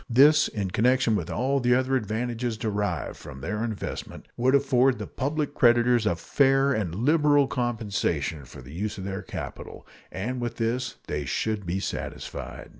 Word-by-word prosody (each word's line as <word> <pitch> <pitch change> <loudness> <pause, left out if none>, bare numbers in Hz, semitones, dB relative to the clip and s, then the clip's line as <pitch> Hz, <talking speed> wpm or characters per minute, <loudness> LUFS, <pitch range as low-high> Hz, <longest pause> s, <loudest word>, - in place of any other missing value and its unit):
This, 145 +5 +6
in 100 -4 -3
connection 120 +1 +3
with 90 -4 -2
all 130 +10 0
the 125 -1 +3
other 130 +1 +1
advantages 120 0 -2
derived 105 -8 -2
from 70 -3 -10
their 105 +10 -3
investment, 110 -3 -5
would 130 +3 +3
afford 135 -1 +4
to - - -6
the - - -12
public 145 +2 -2
creditors 120 -3 +4
a 100 - +2
fair 135 - +3
and 95 -7 -2
liberal 145 - +4
compensation 100 - -2
for 60 - -12
the 65 +4 -11
use 105 +6 -3
of 95 - -6
their 95 +1 -4
capital, - - -8 0.3
and 120 +7 -3
with 120 -1 -3
this 120 +3 -1
they 75 - -3
should 105 +9 -2
be 90 +3 -1
satisfied. - - -6
115 Hz, 170 wpm, -26 LUFS, 100-130 Hz, 0.3 s, This